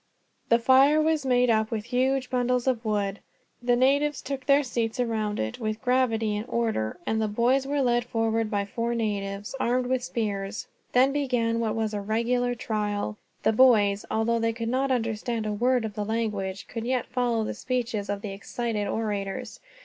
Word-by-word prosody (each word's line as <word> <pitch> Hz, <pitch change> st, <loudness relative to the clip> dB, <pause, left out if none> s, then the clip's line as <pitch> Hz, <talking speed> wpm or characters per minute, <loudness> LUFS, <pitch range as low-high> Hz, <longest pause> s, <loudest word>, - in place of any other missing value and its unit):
The 230 Hz, -, +6 dB
fire 265 Hz, +5 st, +5 dB
was 310 Hz, -3 st, +1 dB
made 250 Hz, -1 st, +4 dB
up 220 Hz, -1 st, +2 dB
with 215 Hz, -2 st, -3 dB
huge 255 Hz, +1 st, 0 dB
bundles 250 Hz, -1 st, +1 dB
of 250 Hz, -3 st, 0 dB
wood; 205 Hz, -2 st, -1 dB, 0.4 s
the 245 Hz, 0 st, +2 dB
natives 285 Hz, +4 st, +2 dB
took 270 Hz, -1 st, -5 dB
their 280 Hz, +1 st, +5 dB
seats 235 Hz, -2 st, -2 dB
around 220 Hz, -3 st, -1 dB
it, 110 Hz, 0 st, -3 dB
with 215 Hz, -1 st, -2 dB
gravity 240 Hz, -4 st, +1 dB
and 210 Hz, +2 st, -3 dB
order; 220 Hz, -, -1 dB
and 220 Hz, 0 st, 0 dB
the 215 Hz, -, +1 dB
boys 245 Hz, +6 st, +2 dB
were 285 Hz, 0 st, +1 dB
led 240 Hz, -1 st, +2 dB
forward 225 Hz, -2 st, 0 dB
by 200 Hz, -2 st, -1 dB
four 235 Hz, +3 st, -2 dB
natives, 205 Hz, -2 st, -3 dB
armed 250 Hz, 0 st, +1 dB
with 255 Hz, 0 st, 0 dB
spears. 205 Hz, -4 st, -3 dB, 0.3 s
Then 260 Hz, +2 st, +5 dB
began 245 Hz, -5 st, 0 dB
what 225 Hz, -2 st, -1 dB
was 220 Hz, -1 st, -1 dB
a 205 Hz, -, -2 dB
regular 240 Hz, +4 st, 0 dB
trial. 210 Hz, -, -2 dB, 0.3 s
The 220 Hz, -, +3 dB
boys, 210 Hz, -5 st, +5 dB
although 230 Hz, +1 st, +1 dB
they 230 Hz, 0 st, +1 dB
could 230 Hz, 0 st, -3 dB
not 265 Hz, +2 st, +1 dB
understand 230 Hz, -2 st, -1 dB
a 210 Hz, -, -1 dB
word 245 Hz, +2 st, +2 dB
of 215 Hz, -, -5 dB
the 210 Hz, 0 st, -3 dB
language, 205 Hz, -3 st, -2 dB
could 230 Hz, 0 st, -5 dB
yet 255 Hz, -1 st, 0 dB
follow 240 Hz, -3 st, 0 dB
the -, -, -3 dB
speeches 235 Hz, -5 st, -2 dB
of 205 Hz, 0 st, -3 dB
the 205 Hz, -, -4 dB
excited 210 Hz, +1 st, -3 dB
orators. 205 Hz, -3 st, -3 dB
230 Hz, 185 wpm, -26 LUFS, 215-250 Hz, 0.4 s, The